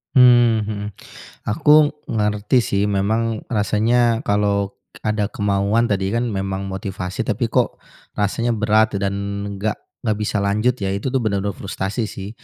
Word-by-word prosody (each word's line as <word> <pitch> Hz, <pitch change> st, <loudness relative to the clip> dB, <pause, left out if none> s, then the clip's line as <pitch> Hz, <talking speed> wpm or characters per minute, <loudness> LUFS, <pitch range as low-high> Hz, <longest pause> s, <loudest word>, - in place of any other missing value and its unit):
Mmm, 120 Hz, -3 st, +6 dB
heeh. 105 Hz, -1 st, -4 dB, 0.6 s
Aku 150 Hz, +7 st, +5 dB, 0.2 s
ngerti, 105 Hz, +3 st, +1 dB
sih, 100 Hz, -2 st, 0 dB
memang 110 Hz, +3 st, 0 dB
rasanya 115 Hz, +2 st, +2 dB
kalau 100 Hz, -2 st, +1 dB, 0.3 s
ada 105 Hz, -1 st, 0 dB
kemauan 105 Hz, +2 st, +1 dB
tadi, 100 Hz, +1 st, 0 dB
kan, 120 Hz, 0 st, 0 dB
memang 95 Hz, 0 st, -3 dB
motivasi 95 Hz, +2 st, -4 dB
tapi, 115 Hz, +1 st, -1 dB
kok, -, -, 0 dB, 0.3 s
rasanya 115 Hz, +3 st, 0 dB
berat 110 Hz, +1 st, +2 dB
dan 100 Hz, 0 st, 0 dB, 0.4 s
nggak 110 Hz, +1 st, -1 dB, 0.3 s
nggak 110 Hz, -3 st, 0 dB
bisa 105 Hz, 0 st, -1 dB
lanjut, 105 Hz, +5 st, +1 dB
ya, 95 Hz, -1 st, -1 dB
itu 105 Hz, +6 st, -2 dB
tu 135 Hz, -, +1 dB
benar-benar 100 Hz, -3 st, -1 dB
frustasi, 100 Hz, +3 st, -3 dB
sih. 100 Hz, 0 st, -7 dB
105 Hz, 140 wpm, -21 LUFS, 100-115 Hz, 0.6 s, Mmm